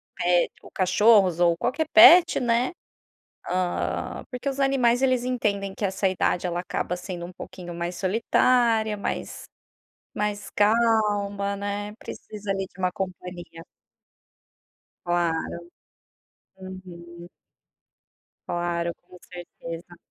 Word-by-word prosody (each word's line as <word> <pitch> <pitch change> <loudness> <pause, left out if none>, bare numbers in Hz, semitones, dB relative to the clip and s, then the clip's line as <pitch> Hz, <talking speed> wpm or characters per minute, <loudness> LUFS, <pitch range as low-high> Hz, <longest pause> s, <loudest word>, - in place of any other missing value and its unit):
pe 175 0 +2
ou - - -14
cachorros 190 -1 +4
ou 170 -1 +3
qualquer 300 - -1
pet, 340 +1 +8
né. 240 0 +1 0.8
Hã, 180 -1 -2
porque 250 +2 -4
os 275 0 -3
animais 260 -3 +2
eles 255 -2 +2
entendem 200 -6 -1
que 210 - -5
essa 190 0 0
idade 185 -1 0
ela 175 0 -2
acaba 180 0 -3
sendo 175 -1 -6
um 180 - -11
pouquinho 175 -1 -9
mais 170 +1 -4
solitária 225 +2 +2
mais 200 - -5 0.7
mais 210 0 -3
calma, 205 -2 +1
né, 205 +1 -4
precisa 210 -3 -7
ali 195 0 -2
de - - -25
uma 185 -1 0
companhia. 180 -2 -7 1.4
Claro. 175 -2 +1 1.2
Uhum. 175 -2 -11 1.2
Claro, 170 0 -2
com 180 +1 -16
certeza. 175 -1 -10
195 Hz, 110 wpm, -25 LUFS, 175-220 Hz, 1.4 s, pet